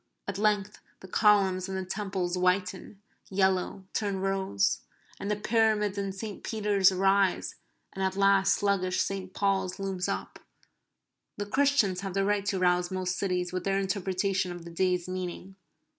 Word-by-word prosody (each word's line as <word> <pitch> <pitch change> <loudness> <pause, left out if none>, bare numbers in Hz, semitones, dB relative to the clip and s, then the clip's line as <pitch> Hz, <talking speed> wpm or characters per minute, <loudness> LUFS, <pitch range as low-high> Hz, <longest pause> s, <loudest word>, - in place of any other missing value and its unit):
At 200 -1 -3
length 210 -1 0 0.2
the 190 - -10
columns 195 -2 +3
and 190 - -3
the 190 - -3
Temples 190 -2 -2
whiten, 185 +2 -1 0.3
yellow, 190 0 0
turn 200 -3 -1
rose; 190 - 0 0.4
and 200 - -4
the 210 - +1
Pyramids 210 -1 +1
and 195 -1 -3
St. 205 0 -6
Peter's 205 -3 +3
arise, 195 0 +2 0.4
and 195 - -3
at 190 0 0
last 195 0 +4
sluggish 190 -2 0
St. 190 -1 -2
Paul's 190 -2 0
looms 190 -2 -2
up. - - -4 1.0
The 205 - -3
Christians 215 -6 +2
have 195 -1 -5
the 195 0 +2
right 205 0 0
to 195 - 0
rouse 180 -1 +2
most 185 -1 -2
cities 180 -2 -1
with 185 -1 -2
their 195 +1 +1
interpretation 190 -1 -1
of 175 -1 -8
the 170 - -9
day's 180 0 0
meaning. 185 +1 -5
195 Hz, 160 wpm, -28 LUFS, 185-200 Hz, 1.0 s, last